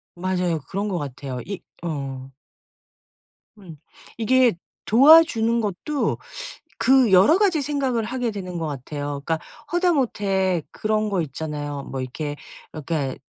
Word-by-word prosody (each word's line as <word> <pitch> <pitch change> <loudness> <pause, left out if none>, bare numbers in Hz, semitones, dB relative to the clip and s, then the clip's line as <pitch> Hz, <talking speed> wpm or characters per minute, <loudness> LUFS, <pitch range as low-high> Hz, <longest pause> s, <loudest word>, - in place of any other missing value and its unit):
맞아요 180 -2 -1
그런 200 +2 -2
것 185 - -1
같아요 135 -3 -5
이 200 -1 -6 0.2
어. 135 -5 -5 1.3
음. 175 -6 -12 0.4
이게 245 +1 +4 0.3
도와주는 235 -3 +6
것도 220 - -2 0.6
그 250 -1 +4
여러 190 - +6
가지 380 -7 +2
생각을 270 -5 -1
하게 245 +1 -2
되는 185 -4 -6
것 165 -1 -2
같아요. 145 0 -5
그러니까 165 -1 0 0.3
하다못해 210 - +1
그런 215 0 -1
거 195 -3 0
있잖아요. 145 -1 -5
뭐 135 -1 -5
이렇게 145 +3 -4 0.4
그러니까 150 -3 -3
190 Hz, 265 characters per minute, -23 LUFS, 150-240 Hz, 1.3 s, 도와주는